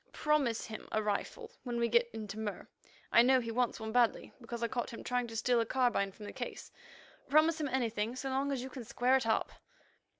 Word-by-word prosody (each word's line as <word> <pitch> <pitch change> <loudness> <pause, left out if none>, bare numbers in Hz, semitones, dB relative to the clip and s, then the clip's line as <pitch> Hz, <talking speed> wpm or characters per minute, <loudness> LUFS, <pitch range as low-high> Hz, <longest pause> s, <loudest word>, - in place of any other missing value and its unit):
Promise 290 -7 +1
him 220 -1 -8
a 215 - +1
rifle 330 - -3
when 240 -2 -3
we 235 - +2
get 235 +1 +3
into 215 -1 -6
Mur; 210 -2 -4 0.4
I 235 - +8
know 260 +2 +5
he 230 -2 -4
wants 240 0 0
one 220 0 -4
badly, 240 -1 +2
because 235 0 -5
I - - +2
caught 240 +1 -3
him 230 - -8
trying 250 -1 -1
to 225 - -8
steal 245 +1 +2
a 230 - +2
carbine 240 -7 +1
from 210 +2 -11
the - - -7
case. - - -6 0.6
Promise 315 +2 +4
him 295 - 0
anything 230 -3 -1
so 270 +1 -4
long 275 +2 0
as 260 -3 -2
you 260 - -6
can 255 -2 -7
square 250 +3 +2
it 260 -3 +1
up." 220 - +1
240 Hz, 225 wpm, -33 LUFS, 225-260 Hz, 0.6 s, I